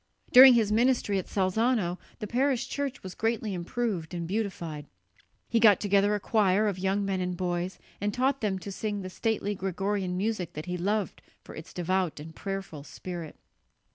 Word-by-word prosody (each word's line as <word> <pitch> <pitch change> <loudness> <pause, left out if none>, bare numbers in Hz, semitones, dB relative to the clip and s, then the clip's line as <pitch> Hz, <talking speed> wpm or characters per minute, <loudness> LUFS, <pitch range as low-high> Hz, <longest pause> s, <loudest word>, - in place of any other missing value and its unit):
During 255 0 +11
his 220 -3 +2
ministry 230 -3 +2
at 185 - -6
Salzano 195 -1 +1 0.2
the 215 - -5
parish 260 +3 0
church 280 -1 -4
was 185 -1 -7
greatly 225 -2 -1
improved 180 -2 -3
and 170 -1 -3
beautified. 170 -7 -3 0.6
He 230 - +2
got 215 -3 +6
together 205 0 +3
a - - -2
choir 210 -1 +2
of 195 -3 -2
young 195 +2 0
men 190 -1 -1
and 180 -1 -2
boys 180 0 -2 0.2
and 205 0 0
taught 265 +5 0
them 200 -3 0
to 195 +2 -7
sing 205 0 -3
the 185 - -6
stately 215 -1 -1
Gregorian 190 0 -2
music 200 -3 -2
that 155 +2 -6
he 180 0 -3
loved 200 +2 -1 0.2
for - - -11
its 160 - -9
devout 180 -2 -1
and 160 +2 -10
prayerful 195 -7 -5
spirit. 170 0 -7
195 Hz, 175 wpm, -28 LUFS, 180-220 Hz, 0.6 s, During